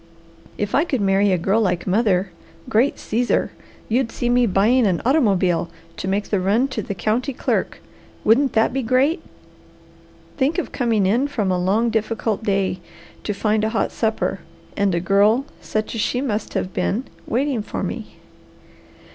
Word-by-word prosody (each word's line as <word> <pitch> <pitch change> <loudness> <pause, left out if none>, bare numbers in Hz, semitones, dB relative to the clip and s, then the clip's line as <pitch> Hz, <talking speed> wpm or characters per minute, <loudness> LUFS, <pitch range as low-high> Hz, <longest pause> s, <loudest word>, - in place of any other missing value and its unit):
If 205 0 -3
I 290 - +4
could 275 -7 -1
marry 195 0 +3
a 185 - +3
girl 195 +6 +1
like 180 -4 0
mother 190 -2 +1 0.4
great 240 +6 +2
Caesar! 240 +3 0 0.4
You'd 235 +1 0
see 240 - -2
me 245 0 +3
buying 220 +5 +3
an 180 -3 +1
automobile 195 - +2 0.3
to - - -4
make 200 +2 -1
the 200 - +2
run 205 +8 +2
to 245 -4 -3
the 200 - -5
county 245 +8 -1
clerk. - - -1 0.4
Wouldn't 260 +4 +3
that 225 +1 +2
be 270 - 0
great! 260 - +2 1.2
Think 285 +5 +1
of 360 - -2
coming 230 -6 +1
in 235 +9 +2
from 210 -9 -1
a 180 - +1
long, 220 +5 +2
difficult 220 -1 -1
day, 195 -3 0 0.4
to - - -2
find 215 +1 +1
a 220 - +1
hot 220 - -1
supper, 220 -3 -1 0.4
and 200 -3 +1
a - - +1
girl 205 +8 +3 0.2
such 215 0 -3
as 225 - -2
she 245 - 0
must 225 -5 -3
have 185 - -2
been, 230 +6 -1 0.2
waiting 260 -1 0
for - - -5
me! - - -5
220 Hz, 170 wpm, -21 LUFS, 195-245 Hz, 1.2 s, I